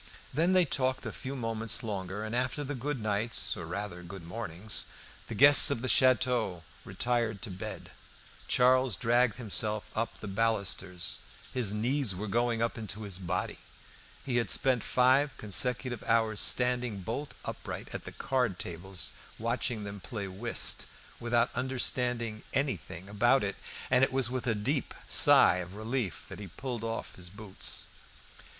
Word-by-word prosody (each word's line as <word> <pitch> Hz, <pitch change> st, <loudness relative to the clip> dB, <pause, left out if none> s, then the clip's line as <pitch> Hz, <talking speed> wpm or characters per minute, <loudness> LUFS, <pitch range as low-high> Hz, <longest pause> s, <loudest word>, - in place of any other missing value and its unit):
Then 165 Hz, +7 st, +2 dB
they 185 Hz, -2 st, +5 dB
talked 130 Hz, -2 st, -1 dB
a -, -, -3 dB
few 135 Hz, +1 st, -6 dB
moments 115 Hz, -2 st, 0 dB
longer, 100 Hz, -1 st, -4 dB
and 110 Hz, +2 st, -4 dB
after 130 Hz, +4 st, -1 dB
the 145 Hz, +1 st, -4 dB
goodnights, 115 Hz, -5 st, -1 dB
or 90 Hz, -5 st, -7 dB
rather 90 Hz, 0 st, -5 dB
good 90 Hz, +1 st, -9 dB
mornings, 105 Hz, +1 st, 0 dB, 0.4 s
the -, -, -5 dB
guests 145 Hz, +2 st, +10 dB
of 130 Hz, -4 st, -1 dB
the -, -, -1 dB
château 120 Hz, -7 st, +3 dB, 0.2 s
retired 115 Hz, -4 st, -1 dB
to 110 Hz, -, -5 dB
bed. 90 Hz, -, -7 dB, 0.6 s
Charles 130 Hz, -2 st, +3 dB
dragged 120 Hz, +1 st, +2 dB
himself 110 Hz, -2 st, -2 dB
up 115 Hz, +1 st, -1 dB
by -, -, -17 dB
the 105 Hz, -, -6 dB
balusters. 100 Hz, -4 st, -1 dB, 0.3 s
His 120 Hz, -6 st, 0 dB
"knees 120 Hz, 0 st, +1 dB
were 105 Hz, +4 st, -4 dB
going 115 Hz, +2 st, +1 dB
up 115 Hz, 0 st, -2 dB
into 110 Hz, 0 st, -5 dB
his 100 Hz, -3 st, -4 dB
body." 90 Hz, 0 st, -3 dB, 0.7 s
He 125 Hz, -3 st, 0 dB
had 115 Hz, -5 st, 0 dB
spent 130 Hz, -3 st, +4 dB
five 130 Hz, +3 st, +3 dB
consecutive 120 Hz, +4 st, +1 dB
hours 110 Hz, -2 st, +2 dB
standing 125 Hz, -4 st, +2 dB
bolt 120 Hz, +10 st, -5 dB
upright -, -, -6 dB
at -, -, -5 dB
the -, -, -7 dB
card 125 Hz, -8 st, -1 dB
tables, 90 Hz, +1 st, -3 dB, 0.3 s
watching 115 Hz, -1 st, -2 dB
them 100 Hz, 0 st, -7 dB
play 100 Hz, -1 st, -6 dB
whist, 105 Hz, +6 st, -1 dB, 0.3 s
without 120 Hz, +1 st, +1 dB
understanding 125 Hz, -3 st, -1 dB
anything 95 Hz, -, -2 dB
about 120 Hz, +6 st, +3 dB
it, 100 Hz, -1 st, -2 dB, 0.4 s
and 130 Hz, +1 st, +5 dB
it 135 Hz, -, +3 dB
was 130 Hz, -2 st, 0 dB
with 130 Hz, -1 st, -3 dB
a 115 Hz, -, +2 dB
deep 130 Hz, +7 st, -2 dB
sigh 90 Hz, -, +6 dB
of 90 Hz, +1 st, -6 dB
relief 110 Hz, -2 st, -3 dB
that -, -, -9 dB
he 100 Hz, -, -7 dB
pulled 120 Hz, +5 st, -6 dB
off 115 Hz, 0 st, -4 dB
his 90 Hz, -1 st, -7 dB
boots. 100 Hz, 0 st, -5 dB
115 Hz, 155 wpm, -30 LUFS, 100-125 Hz, 0.7 s, guests